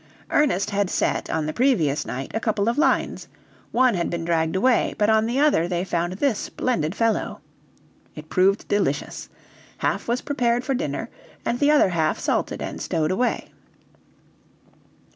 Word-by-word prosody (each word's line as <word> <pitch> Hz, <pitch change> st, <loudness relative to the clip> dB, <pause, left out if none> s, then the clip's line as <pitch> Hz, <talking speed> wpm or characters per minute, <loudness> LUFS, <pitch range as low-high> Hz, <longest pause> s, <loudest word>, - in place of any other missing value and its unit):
Ernest 220 Hz, -10 st, +2 dB
had 200 Hz, -2 st, 0 dB
set, -, -, -1 dB
on 160 Hz, -1 st, -1 dB
the 155 Hz, -, -3 dB
previous 175 Hz, -, +1 dB
night, 130 Hz, +2 st, -5 dB
a 225 Hz, -, 0 dB
couple 215 Hz, -2 st, 0 dB
of 235 Hz, -, +2 dB
lines; 320 Hz, -, +1 dB, 0.4 s
one 255 Hz, 0 st, +4 dB
had 175 Hz, -3 st, -1 dB
been 170 Hz, -1 st, -3 dB
dragged 165 Hz, 0 st, 0 dB
away, 245 Hz, +6 st, +2 dB
but 210 Hz, +1 st, +3 dB
on 220 Hz, 0 st, +3 dB
the 245 Hz, +4 st, 0 dB
other 285 Hz, -, +3 dB
they 175 Hz, 0 st, -1 dB
found 175 Hz, -1 st, -1 dB
this 225 Hz, +3 st, 0 dB
splendid 175 Hz, -9 st, -2 dB
fellow. 230 Hz, 0 st, 0 dB, 0.8 s
It 155 Hz, 0 st, -9 dB
proved 190 Hz, +4 st, +2 dB
delicious. 150 Hz, -9 st, -1 dB, 0.5 s
Half -, -, -1 dB
was 240 Hz, +2 st, 0 dB
prepared 245 Hz, -4 st, 0 dB
for 270 Hz, -, -1 dB
dinner, 270 Hz, +4 st, -3 dB, 0.3 s
and 240 Hz, -, -1 dB
the 290 Hz, -, +3 dB
other 300 Hz, -9 st, +5 dB
half 160 Hz, -3 st, 0 dB
salted -, -, -1 dB
and -, -, -6 dB
stowed 160 Hz, 0 st, 0 dB
away. 245 Hz, +6 st, -1 dB
205 Hz, 160 wpm, -23 LUFS, 170-245 Hz, 0.8 s, other